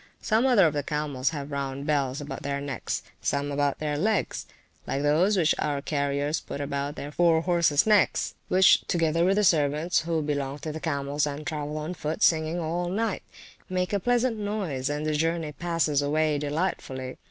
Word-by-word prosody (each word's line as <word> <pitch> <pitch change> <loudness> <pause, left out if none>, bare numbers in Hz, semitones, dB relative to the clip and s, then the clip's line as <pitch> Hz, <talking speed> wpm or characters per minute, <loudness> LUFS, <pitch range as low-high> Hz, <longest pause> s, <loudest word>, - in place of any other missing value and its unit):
Some 225 +4 +2
other 225 -8 +5
of 155 - +2
the 145 - 0
camels 145 -3 -1
have 145 -2 -6
round 140 0 -3
bells 140 -3 0
about 145 - -6
their 140 0 -2
necks, 140 -1 -4 0.2
some 140 0 -1
about 140 0 0
their 150 -1 -2
legs, 210 +2 0 0.4
like 140 - -1
those 170 +8 +3
which 165 -4 +3
our 145 -2 0
carriers 145 +1 -1
put - - -7
about 140 0 -3
their 145 -1 -6
fore 165 0 +3
horses 170 -4 +3
necks; 210 -2 +3
which 185 0 +5
together 165 -1 +1
with 190 +2 +3
the 210 - +2
servants 155 -1 +2
(who 165 -1 -1
belong 140 -2 -2
to 155 +2 -5
the 155 - -6
camels, 145 -1 -1
and 145 +1 -5
travel 150 -2 -3
on 155 +3 -4
foot) 160 +3 -3
singing 160 +1 +3
all 175 +2 -2
night, 210 +2 -1 0.5
make 185 +1 -1
a 200 - +2
pleasant 245 +2 +1
noise, 190 -11 -2
and 150 +1 -2
the 155 - 0
journey 165 0 0
passes 165 -3 0
away 150 +1 +1
delightfully. 145 -4 -3
155 Hz, 185 wpm, -26 LUFS, 145-175 Hz, 0.5 s, other